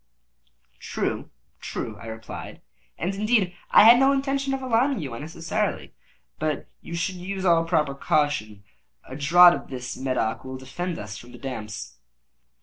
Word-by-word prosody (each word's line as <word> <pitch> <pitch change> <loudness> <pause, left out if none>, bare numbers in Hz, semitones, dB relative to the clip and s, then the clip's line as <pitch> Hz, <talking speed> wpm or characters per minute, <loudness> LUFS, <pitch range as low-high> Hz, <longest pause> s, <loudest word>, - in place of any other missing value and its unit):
"True—true," 110 - -5
I - - -9
replied; 110 0 -8 0.4
"and, 180 +3 -2
indeed, 210 -2 +1 0.2
I - - +8
had 235 +2 +9
no 270 +1 +5
intention 275 0 0
of 270 0 -2
alarming 255 +1 +2
you 140 -7 -5
unnecessarily—but 155 +1 -4
you 170 - -7
should 180 +2 -2
use 190 +1 -4
all 165 -2 +4
proper 155 -4 +1
caution. 140 - 0 0.4
A 130 - -9
draught 175 +5 +7
of - - -6
this 125 -1 -5
Medoc 130 -4 -1
will 130 0 -6
defend 165 +7 -5
us 105 +1 -7
from 120 +1 -14
the - - -10
damps." 105 - -6
155 Hz, 145 wpm, -25 LUFS, 125-190 Hz, 0.4 s, had